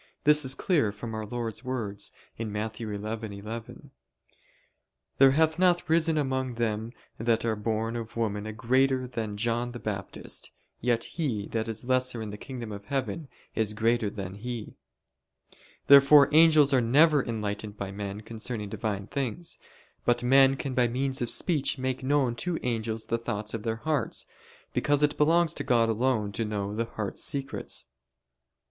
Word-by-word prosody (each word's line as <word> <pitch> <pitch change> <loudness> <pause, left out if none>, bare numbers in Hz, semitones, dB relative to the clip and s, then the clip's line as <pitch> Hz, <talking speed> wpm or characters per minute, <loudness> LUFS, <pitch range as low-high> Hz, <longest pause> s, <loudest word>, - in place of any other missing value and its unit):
This 150 0 +6
is 130 0 +1
clear 150 - +2
from 110 +2 -7
Our 110 -1 -4
Lord's 115 0 -4
words 115 -6 -3 0.3
(Matt. 110 0 -3
11:11): 110 0 -6 1.3
"There 135 0 +8
hath 160 +2 +2
not 180 -1 +3
risen 160 0 +3
among 130 -3 -1
them 110 -1 -1 0.3
that 115 0 +1
are 110 -1 +1
born 110 +2 -2
of 115 -1 -6
woman 105 -2 -1
a - - -4
greater 130 +3 +2
than 110 -4 -4
John 120 +2 -1
the 120 - -6
Baptist; 100 -4 -4 0.3
yet 120 -1 +1
he 130 - -2
that 110 -1 -2
is 115 +1 -4
lesser 130 -1 +1
in 110 -2 -5
the 105 - -7
kingdom 120 -4 -7
of 100 0 -8
heaven 140 +4 -3 0.3
is 110 -1 0
greater 115 0 +2
than 95 -2 -6
he." 115 +2 -6 1.1
Therefore 140 +1 +8
angels 155 -3 +6
are 130 - +5
never 145 +4 +5
enlightened 105 -2 -4
by 100 -1 -4
men 100 +1 -5
concerning 110 -1 -4
Divine 100 -1 -3
things. 140 +8 -3 0.4
But 120 0 +2
men 135 +2 +6
can 135 -1 -4
by 125 -1 +3
means 130 +2 0
of 120 - -1
speech 150 -6 +1
make 130 0 -2
known 135 -3 +2
to 175 +3 -1
angels 115 -2 -2
the 115 - -1
thoughts 105 -2 -3
of 115 - -3
their 110 +1 -1
hearts: 130 +1 -2 0.5
because 145 0 +2
it 150 0 +3
belongs 165 +2 +3
to - - -4
God 115 -2 +3
alone 110 -2 +1
to 115 - -2
know 105 -2 -3
the 115 +2 -1
heart's 110 -3 -4
secrets. 135 -1 -3
115 Hz, 160 wpm, -28 LUFS, 110-135 Hz, 1.3 s, There